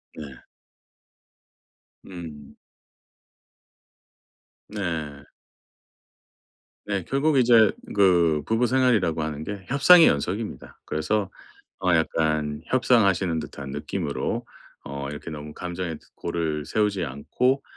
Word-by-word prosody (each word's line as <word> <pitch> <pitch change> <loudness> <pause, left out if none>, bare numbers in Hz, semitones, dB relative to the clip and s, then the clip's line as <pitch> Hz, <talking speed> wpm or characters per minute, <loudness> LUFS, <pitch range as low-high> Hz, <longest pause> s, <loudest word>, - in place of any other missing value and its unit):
네. 80 - -7 1.8
음. 80 -6 -10 2.1
네. 80 -8 -4 1.6
네 100 -3 -2
결국 140 +2 +1
이제 115 -4 +6 0.2
그 85 -6 +4
부부생활이라고 115 -7 +2
하는 75 -1 -4
게 100 0 -6
협상의 160 +6 +7
연속입니다. 95 +10 -3
그래서 95 +6 -1 0.5
어 90 -2 +2
약간 75 -2 0
협상하시는 100 -9 +2
듯한 70 -2 -8
느낌으로 - - -3 0.4
어 70 0 -6
이렇게 75 +3 -7
너무 75 -1 -8
감정의 90 -2 -5 0.2
골을 80 -3 -3
세우지 105 -4 0
않고 125 - -1
85 Hz, 205 characters per minute, -25 LUFS, 75-110 Hz, 2.1 s, 협상의